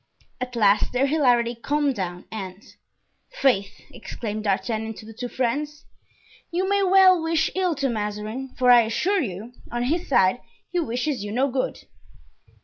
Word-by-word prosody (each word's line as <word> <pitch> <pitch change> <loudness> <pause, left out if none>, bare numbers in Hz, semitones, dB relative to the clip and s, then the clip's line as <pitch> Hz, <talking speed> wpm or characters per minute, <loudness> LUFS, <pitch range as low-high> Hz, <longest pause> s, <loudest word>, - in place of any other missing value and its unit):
At 250 0 -4
last 210 -2 +3
their 255 +2 +2
hilarity 245 -5 +2
calmed 285 +4 0
down 180 -5 -5
and: 195 -2 -7 0.7
"Faith!" 265 - 0
exclaimed 215 -1 -6
D'Artagnan 220 +2 -1
to 215 - -11
the 225 - -10
two 245 +3 -5
friends, 285 +5 -2 0.6
"you 360 +2 -1
may 400 0 +2
well 375 -2 +6
wish 325 0 +1
ill 365 -3 0
to 275 -1 0
Mazarin; 215 +3 -4
for 250 -1 +5
I 240 -1 +8
assure 360 - 0
you, 220 0 -6 0.2
on 240 0 -1
his 325 +7 -1
side 220 -2 +3 0.3
he 355 - 0
wishes 250 -3 -2
you 205 - -5
no 260 +4 +1
good." 255 0 -2
245 Hz, 155 wpm, -24 LUFS, 215-300 Hz, 0.7 s, I